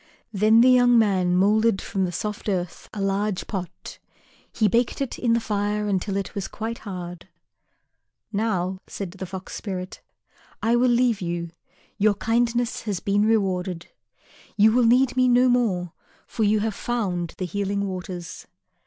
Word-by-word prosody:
Then 215 Hz, +3 st, +5 dB
the 255 Hz, -, +6 dB
young 245 Hz, -1 st, +5 dB
man 190 Hz, -5 st, +2 dB
moulded 210 Hz, +2 st, +3 dB
from 190 Hz, -1 st, -2 dB
the 175 Hz, -, -3 dB
soft 210 Hz, +4 st, -4 dB
earth 180 Hz, -3 st, -3 dB
a 210 Hz, -, -7 dB
large 195 Hz, 0 st, -1 dB
pot. 185 Hz, -4 st, -7 dB, 0.5 s
He 215 Hz, -, +2 dB
baked 235 Hz, +4 st, +1 dB
it 275 Hz, -3 st, -3 dB
in 235 Hz, -2 st, +2 dB
the 230 Hz, -, +3 dB
fire 210 Hz, -1 st, -1 dB
until 195 Hz, 0 st, -1 dB
it 195 Hz, -2 st, -4 dB
was 200 Hz, -2 st, -4 dB
quite 225 Hz, +1 st, -5 dB
hard. 180 Hz, -4 st, -7 dB, 1.1 s
"Now," 190 Hz, -3 st, -1 dB
said 195 Hz, -4 st, -6 dB
the 190 Hz, 0 st, -7 dB
Fox 190 Hz, 0 st, -8 dB
spirit, 185 Hz, -3 st, -6 dB, 0.6 s
"I 230 Hz, +2 st, +2 dB
will 250 Hz, +1 st, +3 dB
leave 240 Hz, -3 st, +2 dB
you. 170 Hz, -1 st, -3 dB, 0.5 s
Your 205 Hz, 0 st, +3 dB
kindness 235 Hz, +2 st, 0 dB
has 195 Hz, -3 st, -1 dB
been 205 Hz, +2 st, +1 dB
rewarded. 185 Hz, -5 st, 0 dB, 0.7 s
You 215 Hz, +1 st, +6 dB
will 240 Hz, 0 st, +3 dB
need 255 Hz, +2 st, +4 dB
me 255 Hz, 0 st, +3 dB
no 250 Hz, +1 st, +5 dB
more, 205 Hz, -9 st, +1 dB, 0.3 s
for 225 Hz, -, -3 dB
you 210 Hz, +1 st, +2 dB
have 220 Hz, 0 st, -1 dB
found 190 Hz, -7 st, -2 dB
the 185 Hz, -, -3 dB
Healing 200 Hz, +2 st, -2 dB
Waters." 185 Hz, -2 st, -6 dB
205 Hz, 160 wpm, -24 LUFS, 185-230 Hz, 1.1 s, the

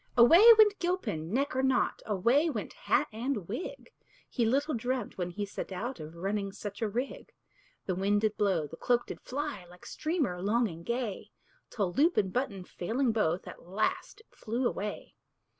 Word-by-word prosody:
Away 285 Hz, -, +8 dB
went 420 Hz, -2 st, +6 dB
Gilpin, 225 Hz, -, -2 dB
neck 270 Hz, +4 st, 0 dB
or 260 Hz, -, +2 dB
nought; 265 Hz, -1 st, +1 dB
Away 235 Hz, -, +3 dB
went 225 Hz, -9 st, -4 dB
hat -, -, +1 dB
and 230 Hz, -4 st, -3 dB
wig; 245 Hz, -, -6 dB, 0.4 s
He 235 Hz, -4 st, 0 dB
little 285 Hz, +6 st, +1 dB
dreamt, 245 Hz, +2 st, -2 dB
when 180 Hz, -1 st, -1 dB
he 205 Hz, +4 st, -4 dB
set 200 Hz, -, -6 dB
out, 240 Hz, +8 st, -4 dB
Of 155 Hz, +2 st, -9 dB
running 195 Hz, +3 st, -2 dB
such 205 Hz, +2 st, -7 dB
a 220 Hz, -, 0 dB
rig. 245 Hz, +6 st, -4 dB, 0.5 s
The 185 Hz, -, -1 dB
wind 200 Hz, +3 st, +1 dB
did 215 Hz, -1 st, +1 dB
blow, 190 Hz, -7 st, +1 dB
the 160 Hz, +3 st, -10 dB
cloak 245 Hz, -1 st, +1 dB
did -, -, -8 dB
fly, 285 Hz, -6 st, -4 dB
Like 180 Hz, 0 st, -15 dB
streamer 295 Hz, -, -2 dB
long 225 Hz, +5 st, +2 dB
and 165 Hz, -3 st, -9 dB
gay, 235 Hz, -1 st, -3 dB, 0.4 s
Till 195 Hz, -5 st, -2 dB
loop 320 Hz, -, +3 dB
and 190 Hz, -3 st, +1 dB
button 205 Hz, -7 st, -2 dB
failing 230 Hz, +9 st, -1 dB
both, 185 Hz, -6 st, 0 dB
At -, -, -11 dB
last 205 Hz, -, -2 dB
it -, -, -29 dB
flew 240 Hz, +3 st, -2 dB
away. 210 Hz, -2 st, -5 dB
220 Hz, 180 wpm, -30 LUFS, 195-265 Hz, 0.5 s, Away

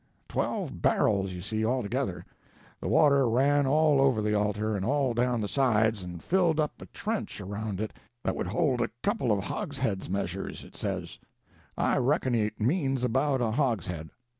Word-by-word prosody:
Twelve -, -, -2 dB
barrels, 95 Hz, -3 st, +2 dB
you 90 Hz, -1 st, -6 dB
see, 110 Hz, +2 st, -2 dB
altogether. 115 Hz, -2 st, -1 dB, 0.5 s
The -, -, -4 dB
water 140 Hz, -4 st, +4 dB
ran 140 Hz, +4 st, +3 dB
all 150 Hz, 0 st, +4 dB
over 135 Hz, -5 st, +3 dB
the 105 Hz, 0 st, 0 dB
altar, 105 Hz, +1 st, 0 dB
and 95 Hz, -, -2 dB
all 135 Hz, +2 st, +1 dB
down 120 Hz, 0 st, +1 dB
the 105 Hz, -, -1 dB
sides, 110 Hz, -5 st, +2 dB
and 90 Hz, -2 st, -8 dB
filled 175 Hz, -4 st, +2 dB
up 150 Hz, -1 st, -1 dB
a -, -, -9 dB
trench 215 Hz, -, -4 dB
around 100 Hz, 0 st, -4 dB
it 110 Hz, 0 st, -3 dB, 0.3 s
that -, -, 0 dB
would -, -, -2 dB
hold 125 Hz, -, +1 dB
a -, -, 0 dB
couple 200 Hz, -, +1 dB
of 100 Hz, -2 st, +1 dB
hogsheads 130 Hz, -, -3 dB
'measures,' 95 Hz, 0 st, -3 dB
it -, -, -15 dB
says; -, -, -4 dB, 0.6 s
I -, -, +2 dB
reckon 130 Hz, 0 st, +1 dB
it 105 Hz, -2 st, 0 dB
means 135 Hz, -, +1 dB
about 130 Hz, +2 st, +1 dB
a 115 Hz, -2 st, +1 dB
hogshead. 95 Hz, -, -1 dB
120 Hz, 170 wpm, -28 LUFS, 105-140 Hz, 0.6 s, water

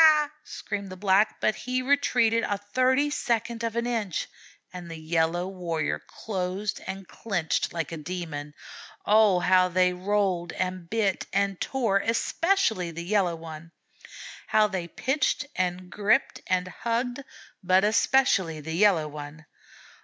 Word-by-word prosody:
screamed 200 Hz, -7 st, -5 dB
the 185 Hz, -, -8 dB
Black, 200 Hz, +2 st, +2 dB
but -, -, +2 dB
he 255 Hz, +3 st, -2 dB
retreated 245 Hz, -4 st, +2 dB
a 205 Hz, -, -1 dB
thirty 255 Hz, +8 st, +1 dB
second 235 Hz, -3 st, -1 dB
of 230 Hz, -1 st, -2 dB
an 235 Hz, 0 st, 0 dB
inch, 225 Hz, -7 st, -2 dB, 0.5 s
and 180 Hz, -2 st, -8 dB
the 165 Hz, -, -7 dB
Yellow 165 Hz, +2 st, 0 dB
Warrior 170 Hz, -5 st, -2 dB
closed 195 Hz, 0 st, -4 dB
and 190 Hz, -1 st, -6 dB
clinched 175 Hz, -8 st, -2 dB
like 165 Hz, -3 st, -3 dB
a 165 Hz, -, -4 dB
demon. 155 Hz, -3 st, -6 dB, 0.5 s
Oh, 210 Hz, -4 st, +5 dB
how 185 Hz, 0 st, +4 dB
they 180 Hz, 0 st, +3 dB
rolled 185 Hz, -2 st, 0 dB
and 185 Hz, -2 st, -3 dB
bit 215 Hz, -4 st, 0 dB
and 195 Hz, -1 st, 0 dB
tore, 230 Hz, -7 st, +1 dB
especially 230 Hz, -, +1 dB
the 170 Hz, +1 st, -6 dB
Yellow 190 Hz, -3 st, +1 dB
One! 165 Hz, 0 st, -10 dB, 0.7 s
How 215 Hz, 0 st, +4 dB
they 190 Hz, -5 st, -3 dB
pitched 270 Hz, -, 0 dB
and 180 Hz, 0 st, -2 dB
gripped 215 Hz, +6 st, +1 dB
and 185 Hz, -1 st, +1 dB
hugged, 245 Hz, +6 st, -2 dB, 0.4 s
but 185 Hz, +1 st, +4 dB
especially 210 Hz, -6 st, +3 dB
the 160 Hz, +2 st, -6 dB
Yellow 175 Hz, -4 st, +4 dB
One! 150 Hz, +1 st, -9 dB
190 Hz, 140 wpm, -26 LUFS, 175-220 Hz, 0.7 s, Oh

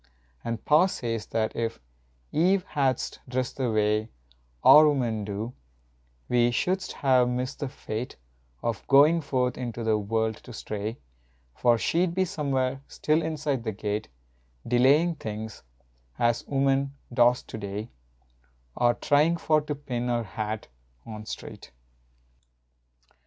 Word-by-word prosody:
And 115 Hz, -2 st, -4 dB
pa 155 Hz, +5 st, +5 dB
says 115 Hz, -, -3 dB
that 110 Hz, -1 st, -1 dB
if 115 Hz, -1 st, -2 dB, 0.5 s
Eve 180 Hz, +5 st, +3 dB
hadst 135 Hz, -6 st, -1 dB
dressed 130 Hz, 0 st, -2 dB
the 130 Hz, -3 st, 0 dB
way 105 Hz, 0 st, +1 dB, 0.5 s
Our 155 Hz, 0 st, +9 dB
women 120 Hz, -7 st, 0 dB
do 105 Hz, +4 st, -4 dB, 0.7 s
we 120 Hz, -1 st, +3 dB
shouldst 185 Hz, +9 st, -1 dB
have 130 Hz, -3 st, +3 dB
missed 125 Hz, +2 st, -3 dB
the 140 Hz, -, -3 dB
fate 125 Hz, -2 st, -5 dB, 0.5 s
Of 115 Hz, -4 st, -3 dB
goin 150 Hz, +5 st, +6 dB
forth 125 Hz, -3 st, -1 dB
into 120 Hz, -2 st, -4 dB
the 110 Hz, -1 st, +2 dB
world 110 Hz, +1 st, -1 dB
to 125 Hz, -, -12 dB
stray, 110 Hz, +2 st, -4 dB, 0.6 s
For 120 Hz, -1 st, +3 dB
she 170 Hz, +10 st, +1 dB
d 170 Hz, -, -4 dB
be 190 Hz, +1 st, +2 dB
somewhere, 135 Hz, -6 st, -1 dB
still, 155 Hz, +2 st, +1 dB
inside 150 Hz, -5 st, -2 dB
the 110 Hz, -2 st, -2 dB
gate 105 Hz, +1 st, -3 dB, 0.6 s
Delayin 140 Hz, +7 st, +4 dB
things, 110 Hz, -5 st, -6 dB, 0.6 s
as 120 Hz, 0 st, +1 dB
women 135 Hz, 0 st, +1 dB, 0.2 s
dost 120 Hz, +1 st, +3 dB
to 110 Hz, -, -6 dB
day, 100 Hz, +2 st, -5 dB, 0.8 s
A 120 Hz, 0 st, +3 dB
tryin 150 Hz, +3 st, +3 dB
for 155 Hz, -2 st, +2 dB
to 150 Hz, 0 st, -4 dB
pin 125 Hz, -4 st, -4 dB
her 120 Hz, -1 st, 0 dB
hat 105 Hz, +2 st, -4 dB, 0.4 s
on 110 Hz, -1 st, -8 dB
straight. -, -, -8 dB
125 Hz, 135 wpm, -27 LUFS, 110-145 Hz, 0.8 s, Our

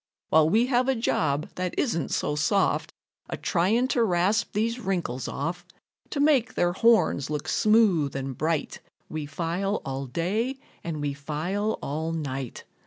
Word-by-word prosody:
While 155 Hz, 0 st, +5 dB
we 225 Hz, +7 st, +4 dB
have 250 Hz, 0 st, +2 dB
a 265 Hz, -, +3 dB
job 155 Hz, -, 0 dB
that 180 Hz, -1 st, -3 dB
isn't 170 Hz, -, 0 dB
so 150 Hz, -, -1 dB
soft, 180 Hz, +7 st, +1 dB, 0.4 s
A -, -, -3 dB
trying 205 Hz, +8 st, +2 dB
to 240 Hz, -, +2 dB
rasp 190 Hz, +2 st, +1 dB
these 230 Hz, +3 st, 0 dB
wrinkles 175 Hz, -, -2 dB
off, 170 Hz, +5 st, -3 dB, 0.5 s
To 285 Hz, -, -3 dB
make 285 Hz, -5 st, +3 dB
their 175 Hz, 0 st, +2 dB
horns 220 Hz, -, +3 dB
look 150 Hz, -1 st, -3 dB
smooth 205 Hz, -11 st, +3 dB
and 135 Hz, -1 st, -3 dB
bright, 155 Hz, +1 st, -1 dB, 0.3 s
We 155 Hz, -2 st, -4 dB
file 175 Hz, +7 st, -1 dB
all 135 Hz, 0 st, -4 dB
day 205 Hz, -, -1 dB, 0.3 s
and 160 Hz, -3 st, -4 dB
we 145 Hz, -1 st, -1 dB
file 160 Hz, +9 st, -2 dB
all 160 Hz, +3 st, -2 dB
night. 135 Hz, -5 st, -4 dB
175 Hz, 155 wpm, -26 LUFS, 150-220 Hz, 0.5 s, While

